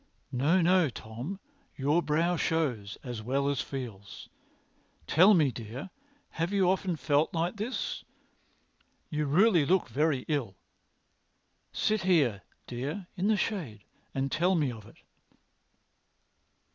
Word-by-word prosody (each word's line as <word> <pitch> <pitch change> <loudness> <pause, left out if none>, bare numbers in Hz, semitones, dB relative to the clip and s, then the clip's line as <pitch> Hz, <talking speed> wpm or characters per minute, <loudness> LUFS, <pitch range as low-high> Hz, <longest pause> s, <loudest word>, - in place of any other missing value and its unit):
"No, 150 +9 +3
no, 180 -2 +4
Tom; 120 - -7 0.4
your 145 +5 +2
brow 165 +3 +1
shows, 130 -13 -1
as 120 -4 -5
well 135 +5 0
as 140 -1 0
feels. 115 -8 -7 0.8
Tell 190 +6 +6
me, 150 -6 +3
dear, 120 - -7 0.4
have 165 +3 -2
you 195 -3 +3
often 185 -1 +1
felt 145 +3 +1
like 170 +5 -1
this? 225 +5 -3 1.1
You 150 -1 -1
really 175 +3 +4
look 180 +2 +2
very 140 +1 +1
ill. 135 -11 -1 1.2
Sit 215 0 0
here, 145 - +2 0.2
dear, 140 +10 -4
in 185 +3 0
the 215 -1 +3
shade 150 - -3 0.3
and 135 0 -1
tell 180 +4 +2
me 150 -6 +1
of 110 -3 -10
it." - - -17
150 Hz, 125 wpm, -29 LUFS, 125-180 Hz, 1.2 s, Tell